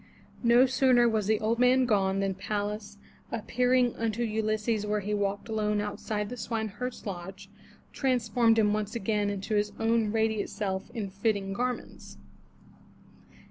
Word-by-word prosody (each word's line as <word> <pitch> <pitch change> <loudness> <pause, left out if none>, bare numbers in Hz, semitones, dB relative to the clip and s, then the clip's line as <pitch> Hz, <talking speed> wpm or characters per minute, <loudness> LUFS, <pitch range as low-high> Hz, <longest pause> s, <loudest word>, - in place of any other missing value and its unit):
No 240 +1 +6
sooner 255 -2 +4
was 215 -3 0
the 220 0 +2
old 225 +2 0
man 250 +1 +5
gone 195 -4 +1
than 195 -1 0
Pallas, 205 +1 -4 0.3
appearing 245 +2 +1
unto 230 +1 -1
Ulysses 215 0 0
where 210 0 -1
he 210 +2 -3
walked 200 0 -1
alone 210 -2 0
outside 210 0 -3
the 250 - -6
swine 220 -2 -2
herd's 250 +5 -6
lodge, 195 +1 -7 0.4
transformed 235 -3 +2
him 210 -2 +3
once 215 0 -2
again 205 -2 -1
to 195 +3 -4
his 210 0 +1
own 225 -1 +2
radiant 220 -1 0
self 190 -1 -3
in 205 -4 -4
fitting 200 -1 -1
garments. 250 +4 -4
215 Hz, 145 wpm, -28 LUFS, 205-235 Hz, 0.4 s, No